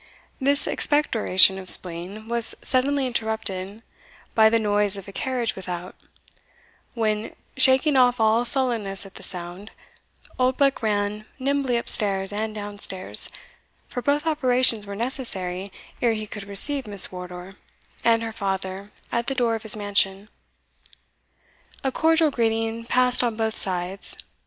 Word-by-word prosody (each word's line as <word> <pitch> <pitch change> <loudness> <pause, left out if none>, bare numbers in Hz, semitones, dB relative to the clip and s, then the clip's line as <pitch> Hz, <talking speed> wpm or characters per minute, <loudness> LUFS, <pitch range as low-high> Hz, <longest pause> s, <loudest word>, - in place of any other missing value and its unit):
This 280 +2 +2
expectoration 215 -10 +3
of 185 -1 -8
spleen 185 +5 0
was 235 -1 0
suddenly 275 +1 +1
interrupted 220 -4 -3 0.5
by 220 -1 +5
the 230 - +2
noise 205 -2 +1
of 195 - -10
a - - -9
carriage 245 +1 -2
without, 180 -1 -7 1.0
when, 215 -2 -2 0.2
shaking 265 +3 +4
off 250 -2 +3
all 220 +2 +2
sullenness 235 -7 +1
at 195 - -13
the - - -12
sound, 180 +3 -6 0.7
Oldbuck 260 +2 +1
ran 210 -1 -2
nimbly 275 -2 -1
up 235 - -5
stairs 195 -2 +1
and 215 +1 -3
down 205 -1 -7
stairs, 190 -2 +3 0.6
for 245 - -5
both 290 +4 0
operations 255 -8 +3
were 200 - -6
necessary 200 -6 -3 0.3
ere 235 -2 +2
he 215 -1 -5
could 210 -1 -8
receive 250 +6 +2
Miss 200 -2 +6
Wardour 180 0 -9 0.5
and 230 -1 +2
her 225 -1 -5
father 195 -1 -5 0.2
at 235 0 -2
the 270 - -1
door 240 -2 +1
of 225 - -4
his 220 -1 +3
mansion. 200 -1 0 1.5
A 265 - -1
cordial 320 +1 +2
greeting 225 -1 -1
passed 250 0 +2
on 235 -2 -1
both 220 0 -2
sides. 185 0 0
220 Hz, 140 wpm, -23 LUFS, 195-250 Hz, 1.5 s, Miss